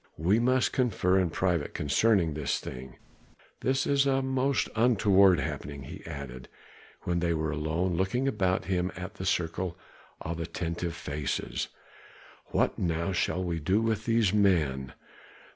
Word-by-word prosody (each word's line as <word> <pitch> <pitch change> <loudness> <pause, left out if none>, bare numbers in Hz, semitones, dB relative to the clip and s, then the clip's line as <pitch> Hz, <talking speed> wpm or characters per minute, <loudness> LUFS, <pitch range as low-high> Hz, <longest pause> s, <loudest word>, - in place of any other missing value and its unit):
"We 95 +8 +3
must 130 +1 +2
confer 95 -7 +2
in 90 -2 +1
private 85 -2 -1
concerning 85 +3 +2
this 75 -1 -1
thing. 65 0 -8 0.6
This 130 +1 +1
is 140 0 +3
a 135 0 +2
most 130 0 +1
untoward 100 -6 +5
happening," 70 -1 -5
he - - -9
added, 65 -3 -7 0.5
when 85 -1 -1
they 85 -1 +1
were 80 -1 -1
alone, 80 +4 -1
looking 110 +9 0
about 95 -7 0
him 90 -1 0
at 90 +2 -6
the 95 -3 -5
circle 85 0 -1 0.4
of 85 +1 -5
attentive 85 0 -3
faces. 75 -1 -3 0.8
"What - - 0
now 85 +1 0
shall 90 0 0
we 85 -2 -2
do 95 +7 +2
with 110 -1 -1
these 115 -4 +3
men?" 75 -11 +2
90 Hz, 145 wpm, -29 LUFS, 80-110 Hz, 0.8 s, untoward